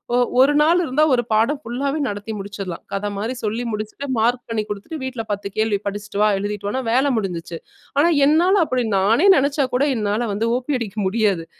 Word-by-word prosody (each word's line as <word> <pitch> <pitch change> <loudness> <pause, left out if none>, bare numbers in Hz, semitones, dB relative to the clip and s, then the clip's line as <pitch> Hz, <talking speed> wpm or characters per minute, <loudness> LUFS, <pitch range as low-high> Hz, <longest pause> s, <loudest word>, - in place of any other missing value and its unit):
ஒ - - +3 0.2
ஒரு 275 +3 +6
நாள் 335 +4 +4
இருந்தா 300 0 +1
ஒரு 240 -1 +2
பாடம் 230 +7 +2
ஃபுல்லாவே 275 +5 -2
நடத்தி 205 +1 -5
முடிச்சிடலாம். 195 -3 -6
கத 205 +1 -2
மாரி 225 +5 -2
சொல்லி 220 +3 -2
முடிச்சுட்டு, 215 +6 -5
மார்க் 240 +3 +1
பண்ணி 220 -2 -1
குடுத்துட்டு, 210 +10 -6
வீட்ல 255 -3 -4
10 200 0 -3
கேள்வி 215 -1 +1
படிச்சிட்டு 205 0 -4
வா, 210 - +5
எழுதிட்டு 205 0 -4
வான்னா 260 +5 -2
வேல 265 +4 +2
முடிஞ்சிச்சு. 175 -4 -4 0.4
ஆனா 310 +4 +5 0.2
என்னால 350 +6 +4
அப்டி, 255 -4 -1
நானே 225 - +3
நெனச்சா 280 +1 +2
கூட 275 +3 +3
என்னால 215 +2 -1
வந்து 225 +3 -1
ஓ.பி 265 +3 -2
அடிக்க 215 -2 -6
முடியாது. 200 -5 0
225 Hz, 185 wpm, -21 LUFS, 205-270 Hz, 0.4 s, ஒரு